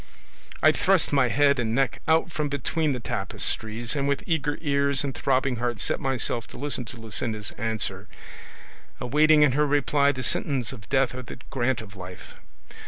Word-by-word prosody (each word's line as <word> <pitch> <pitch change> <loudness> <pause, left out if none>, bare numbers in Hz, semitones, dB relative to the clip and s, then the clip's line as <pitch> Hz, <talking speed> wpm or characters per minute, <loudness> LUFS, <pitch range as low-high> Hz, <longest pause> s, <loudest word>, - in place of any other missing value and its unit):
I - - +7
thrust 190 -6 +1
my 135 -3 +4
head 140 +2 +3
and 115 -1 -1
neck 135 -2 0
out 160 +1 +2
from 150 -3 -2
between 145 +3 -1
the 130 - -2
tapestries, 115 +1 -1
and 140 -1 0
with 140 0 -1
eager 150 -4 -1
ears 140 -2 +1
and 140 -2 -3
throbbing 130 -1 0
heart 120 -2 -2
set - - +3
myself 125 -3 -1
to - - -12
listen 140 -2 -1
to 120 - -10
Luscinda's 110 -1 -3
answer, 110 -3 -2 0.9
awaiting 150 +4 +4
in 145 - +4
her 150 +3 +1
reply 145 0 +2
the 130 -2 -5
sentence 130 -4 -1
of 105 -6 -13
death 135 -1 +2
or 130 - -6
the 125 - -10
grant 130 -1 0
of 105 -2 -12
life. 90 -1 -10
135 Hz, 175 wpm, -25 LUFS, 115-145 Hz, 0.9 s, I